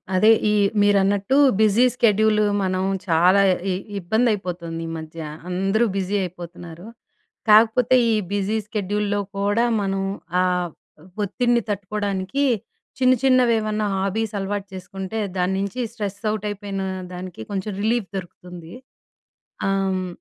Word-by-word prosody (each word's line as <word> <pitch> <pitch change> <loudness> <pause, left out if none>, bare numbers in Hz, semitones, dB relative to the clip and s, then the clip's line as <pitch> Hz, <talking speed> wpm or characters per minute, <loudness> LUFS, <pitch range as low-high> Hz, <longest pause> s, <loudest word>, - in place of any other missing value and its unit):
అదే 215 +4 +5 0.2
ఈ - - +2 0.3
మీరన్నట్టు 205 +4 +3 0.2
బిజీ 215 +3 +5
స్కెడ్యూల్ 215 -2 +3 0.2
మనం 185 0 0 0.2
చాలా 180 +4 +4 0.3
ఇ - - +1 0.3
ఇబ్బంది 220 +7 +1
అయిపోతోందీమధ్య, 165 -4 -5 0.3
అందరూ 195 +5 +1
బిజీ 195 +1 -1
అయిపోతున్నారు. 175 0 -9 0.6
కాకపోతే 225 +4 +5 0.2
ఈ - - +3 0.2
బిజీ 205 +2 0
స్కెడ్యూల్‌లో 205 -1 -1 0.2
కూడా 205 +3 +1 0.2
మనం 195 -1 -1 0.4
ఆహ్, 180 -1 0 0.5
ఒత్తిడిని 240 +4 +1
తట్టుకోవడానికి, 200 +3 -2 0.6
చిన్న 255 -1 +5
చిన్నవి 255 -3 +4
ఏమన్నా 215 0 -1
హాబీస్ 200 +3 -1
అలవాటు 200 +1 -3
చేసుకుంటే, 190 +3 -6 0.2
దాని 180 +1 +1
నుంచి 200 +5 -3
స్ట్రెస్ 205 -3 -5
అవుట్ 215 -1 -4
అయిపోయిన 200 -1 -4 0.3
దానికి 180 -8 -8
కొంచెం 200 +1 -3
రిలీఫ్ 225 -2 0
దొరుకుతుంది. 175 -2 -10 0.9
హ్మ్. 195 -1 0
200 Hz, 115 wpm, -22 LUFS, 185-215 Hz, 0.9 s, అదే